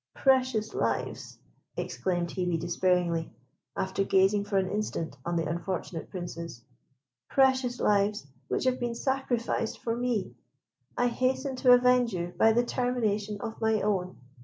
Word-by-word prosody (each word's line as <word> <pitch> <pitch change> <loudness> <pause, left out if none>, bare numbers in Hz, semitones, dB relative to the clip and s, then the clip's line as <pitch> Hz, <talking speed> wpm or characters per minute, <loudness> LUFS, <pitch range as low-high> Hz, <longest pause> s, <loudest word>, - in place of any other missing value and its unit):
"Precious 255 -5 +2
lives," - - -2 0.4
exclaimed 175 -2 -2
Hebe, 175 -2 -1
despairingly, 175 -1 +1 0.5
after 190 +1 0
gazing 195 +1 +3
for 205 -1 0
an 190 -1 +2
instant 200 -8 -3
on 170 - -2
the 165 -2 0
unfortunate 170 0 -4
Princes, 170 - -7 0.7
"precious 260 -2 +3
lives, 205 -3 +2 0.2
which - - -1
have 255 0 +1
been 240 -1 -2
sacrificed 245 -4 -1
for 230 -1 -2
me; 240 -4 -1 0.6
I 245 - +2
hasten 260 +2 0
to 250 -1 +6
avenge 245 -2 +4
you 175 0 -3
by 225 - +5
the 240 +2 +2
termination 215 -5 -1
of 225 +1 -6
my 220 -1 +2
own!" 190 -3 -1
210 Hz, 135 wpm, -28 LUFS, 180-245 Hz, 0.7 s, to